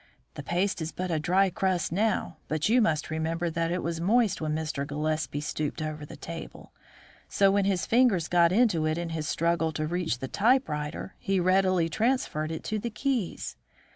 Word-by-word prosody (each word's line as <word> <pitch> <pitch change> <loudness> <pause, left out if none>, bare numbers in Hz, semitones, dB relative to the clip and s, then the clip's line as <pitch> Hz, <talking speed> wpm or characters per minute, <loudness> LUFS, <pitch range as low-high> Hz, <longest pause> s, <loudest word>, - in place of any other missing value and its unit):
The - - -7
paste 180 +5 -1
is 160 +1 -3
but 185 0 -4
a 160 - +1
dry 185 +4 +2
crust 185 -5 0
now, 200 -3 0
but 155 +1 0
you 245 +2 +5
must 155 -8 0
remember 165 +2 -1
that 165 +1 -1
it 180 - -1
was 165 0 -2
moist 215 +1 +2
when 155 -1 -1
Mr. 155 -3 -2
Gillespie 150 +1 -2
stooped 150 0 -3
over 155 -1 -4
the - - -10
table, 165 0 -9 0.6
so 200 - +2
that 195 - +6
when 200 0 +2
his 190 -3 +1
fingers 225 -9 +3
got 170 -1 +4
into 185 -7 +3
it 155 +1 0
in 170 -1 -3
his 160 -2 -3
struggle 170 0 +1
to 155 - -2
reach 170 -4 -1
the 130 - -5
typewriter, 195 - 0
he 195 -1 0
readily 185 -1 +3
transferred 190 - 0
it 160 - -5
to 215 - -2
the 235 - -3
keys. 240 -4 -2
170 Hz, 195 wpm, -28 LUFS, 155-195 Hz, 0.6 s, that